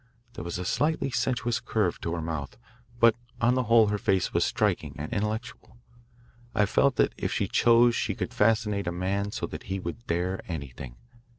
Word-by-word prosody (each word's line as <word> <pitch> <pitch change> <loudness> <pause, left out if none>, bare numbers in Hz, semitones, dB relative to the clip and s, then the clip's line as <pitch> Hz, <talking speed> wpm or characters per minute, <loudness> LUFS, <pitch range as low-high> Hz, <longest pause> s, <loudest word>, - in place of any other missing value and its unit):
There - - -7
was 85 0 -4
a 90 - -4
slightly 150 - 0
sensuous 120 -2 0
curve 105 -6 -1
to 85 - -2
her 85 - -4
mouth, 80 +3 -4 0.4
but 115 -1 +6 0.2
on 120 +1 +3
the 130 -1 0
whole 115 -1 +5
her 105 0 -1
face 95 -2 +1
was - - +3
striking 75 -1 0
and 75 +1 -5
intellectual. 110 +4 -4 0.8
I 105 -2 +4
felt 135 +6 +2
that - - +2
if - - -1
she - - 0
chose 120 0 +5
she - - -1
could - - -4
fascinate 105 -2 +1
a - - 0
man 95 +3 -1
so - - -3
that 75 - -8
he 95 +1 -1
would 90 +6 -7
dare 90 +3 -1
anything. 70 -6 -7
100 Hz, 190 wpm, -27 LUFS, 85-115 Hz, 0.8 s, but